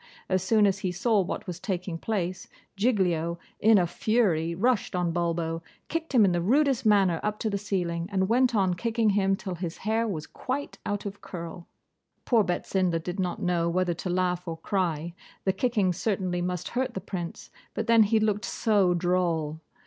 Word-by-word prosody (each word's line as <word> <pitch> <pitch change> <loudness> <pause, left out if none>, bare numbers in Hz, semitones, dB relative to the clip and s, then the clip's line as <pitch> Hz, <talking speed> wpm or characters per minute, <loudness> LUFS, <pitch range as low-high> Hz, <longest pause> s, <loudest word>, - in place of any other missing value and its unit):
As 185 -1 +2
soon 210 +3 +4
as 195 -1 +2
he 190 -2 -1
saw 205 +4 +2
what 185 - -4
was 180 -2 -6
taking 180 -4 -3
place, 185 -4 -2 0.3
Giglio, 180 -7 +1 0.2
in 220 0 +6
a 180 - +3
fury, 175 -3 +1
rushed 235 +1 +1
on 175 -1 +1
Bulbo, 165 -1 -1 0.3
kicked 325 -3 -3
him 220 -4 +7
in 190 - +3
the 175 -1 0
rudest 265 - +2
manner 195 -5 +4
up 210 0 -2
to 220 - -2
the 200 - 0
ceiling, 175 -4 -2
and 190 -1 +1
went 245 +2 +3
on 190 -3 +3
kicking 225 +3 +1
him 195 -1 +2
till 190 -1 -5
his 175 -1 -5
hair 225 +2 +1
was 160 -8 -3
quite 270 +3 -5
out 205 0 -2
of 200 0 -6
curl. 170 -1 -8 0.6
Poor 230 -4 +4
Betsinda 180 -1 0
did 175 +4 -5
not 180 -2 -2
know 170 -1 +1
whether 180 0 +1
to 175 +2 -5
laugh 180 0 0
or 165 - -3
to 160 - -23
cry; 170 -4 -1 0.3
the 190 - +3
kicking 205 -3 +1
certainly 185 -2 -1
must 180 0 -3
hurt 255 +1 -2
the - - -1
Prince, 175 -2 -6 0.2
but - - -1
then 230 -1 +6
he 220 +1 +4
looked 210 -1 0
so 200 -5 +2
droll! 170 -3 0
185 Hz, 190 wpm, -27 LUFS, 175-215 Hz, 0.6 s, him